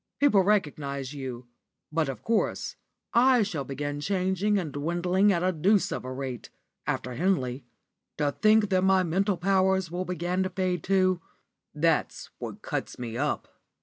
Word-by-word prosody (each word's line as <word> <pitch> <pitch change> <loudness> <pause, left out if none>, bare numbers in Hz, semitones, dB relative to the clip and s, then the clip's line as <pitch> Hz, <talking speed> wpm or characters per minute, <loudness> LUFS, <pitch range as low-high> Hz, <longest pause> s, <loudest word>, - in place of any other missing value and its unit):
People 270 -9 +5
recognise 145 -9 0
you, 130 -3 -6 0.5
but, 155 -2 0
of 135 - -6
course, 225 -2 0 0.4
I 250 -1 +5
shall 175 -9 -3
begin 145 +2 -4
changing 190 +4 +1
and 170 -6 -2
dwindling 175 +7 +2
at 175 -2 +1
a 185 - +3
deuce 190 +5 +2
of - - -3
a 130 - -5
rate, 130 -3 -5 0.4
after 125 - -2
Henley. 130 -5 0 0.5
To 145 -1 +1
think 215 +3 +4
that 185 -1 +3
my 190 -1 +4
mental 190 +3 +1
powers 190 -1 +2
will 180 +1 -2
begin 180 +1 -1
to 190 - 0
fade, 185 -2 -1
too 185 -2 +2 0.5
that's 160 +1 0
what - - -7
cuts - - -4
me 115 -2 -5
up." 145 +4 -1
180 Hz, 155 wpm, -27 LUFS, 145-190 Hz, 0.5 s, People